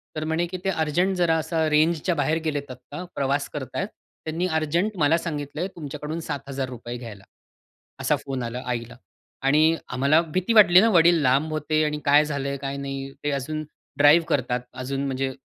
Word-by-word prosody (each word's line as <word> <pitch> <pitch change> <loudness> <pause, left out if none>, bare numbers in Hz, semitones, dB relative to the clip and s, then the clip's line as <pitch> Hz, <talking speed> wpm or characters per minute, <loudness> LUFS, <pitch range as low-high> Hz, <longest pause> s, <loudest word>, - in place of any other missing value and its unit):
तर 155 - -3
म्हणे 160 +2 0
की 185 +1 -5
"ते 195 - 0
अर्जंट 175 +3 +1
जरा 170 -2 +3
असा 160 0 0
रेंजच्या 160 +3 +2
बाहेर 155 +2 +1
गेलेत 145 -3 -2
आत्ता 130 +8 -9
प्रवास 140 +1 0
करतायत, 150 +7 -4 0.4
त्यांनी 165 +3 -1
अर्जंट 175 +7 -1
मला 155 +1 +3
सांगितलंय 150 +1 -4
तुमच्याकडून 150 +1 -5
₹7,000 130 -4 -5
घ्यायला," 110 -5 -10 0.8
असा - - +2
फोन 135 -3 -3
आला 120 +2 -4
आईला. 120 -1 -4 0.5
आणि 155 +4 +4
आम्हाला 140 +6 +3
भीती 180 +6 -1
वाटली 195 -4 +8
ना, 230 - +4
वडील 170 -4 +5
लांब 140 +4 +2
होते 155 0 0
आणि 150 0 -2
काय 145 +2 +5
झालंय, 140 -2 -3
काय 140 0 -4
नाही. 135 0 -5
ते 145 - 0
अजून 155 +3 -3 0.3
ड्राईव्ह 150 +3 +6
करतात 125 -2 0
अजून. 135 +2 -3
म्हणजे 135 0 -2
150 Hz, 165 wpm, -24 LUFS, 135-165 Hz, 0.8 s, वाटली